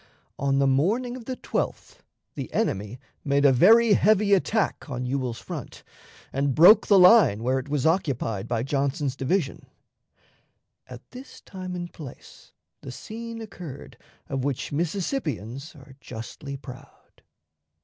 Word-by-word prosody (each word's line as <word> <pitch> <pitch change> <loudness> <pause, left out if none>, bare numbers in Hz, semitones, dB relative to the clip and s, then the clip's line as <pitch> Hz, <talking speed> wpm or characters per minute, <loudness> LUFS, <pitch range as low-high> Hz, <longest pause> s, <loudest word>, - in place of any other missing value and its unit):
On 135 -1 +1
the 140 - +3
morning 205 - +1
of 250 -3 -10
the 255 0 -5
12th - - -4 0.3
the - - -6
enemy 105 +5 -2 0.2
made 140 0 +1
a 140 - +7
very 220 - +6
heavy 205 0 +3
attack 200 -3 0
on 125 -1 -4
Ewell's 125 -2 -2
front, - - -8 0.5
and 135 -1 0
broke 180 +8 +7
the 200 - +6
line 180 - +6
where 130 +2 +1
it 130 - -9
was 145 -1 -1
occupied 135 - 0
by 115 -1 -1
Johnson's 140 +1 -1
division. 140 +2 -2 1.2
At 125 0 -12
this 255 +2 -11
time 185 -1 -7
and 175 -1 -6
place 145 -6 -12 0.3
the 130 - -8
scene 230 - -8
occurred 175 -10 -10 0.3
of 135 -2 -3
which 140 -2 -3
Mississippians 155 - -3
are 135 -2 -15
justly 135 +4 -8
proud. 135 0 -14
140 Hz, 140 wpm, -25 LUFS, 130-195 Hz, 1.2 s, a